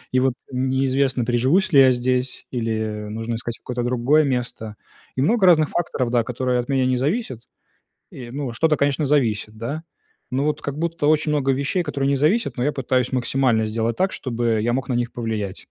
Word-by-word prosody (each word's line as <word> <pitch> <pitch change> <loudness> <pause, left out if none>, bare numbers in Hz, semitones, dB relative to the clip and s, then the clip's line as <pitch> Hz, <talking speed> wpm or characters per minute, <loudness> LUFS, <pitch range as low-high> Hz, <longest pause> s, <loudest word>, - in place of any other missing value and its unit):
и 130 - +3
вот 130 -1 +2 0.2
неизвестно, 130 0 +1
приживусь 130 +11 +2
ли 135 - +9
я 130 -1 +7
здесь, 125 +1 -1
или 110 -3 -2
нужно 115 +2 -4
искать 120 0 -5
какое-то 125 -1 -4
другое 125 +5 +3
место. 120 -5 -3 0.4
И 130 - 0
много 205 - +2
разных 155 -4 +5
факторов, 130 -8 -2
да, 120 -2 +2
которые 125 +1 -1
от 120 - -7
меня 130 -1 +2
не 130 -1 +2
зависят. 135 - -2 0.7
И, 120 -3 -9
ну, 135 -2 -4
что-то, 155 +4 +2
конечно, 145 +1 +1
зависит, 110 -6 0
да, 140 +8 -4 0.5
ну 135 +2 0
вот 150 0 -1
как 140 +1 -4
будто 165 -2 -1
очень 155 0 +2
много 140 -2 +1
вещей, 140 +7 0
которые 140 -3 -2
не 140 - +2
зависят, 155 - +1
но 125 - -1
я 145 - +1
пытаюсь 130 -1 0
максимально 125 -3 +1
сделать 115 +1 -1
так, 190 +1 +1
чтобы 115 -3 -1
я 120 +1 +1
мог 130 +1 -2
на 130 - 0
них 120 0 -1
повлиять. 110 -5 -4
130 Hz, 195 wpm, -22 LUFS, 120-145 Hz, 0.7 s, ли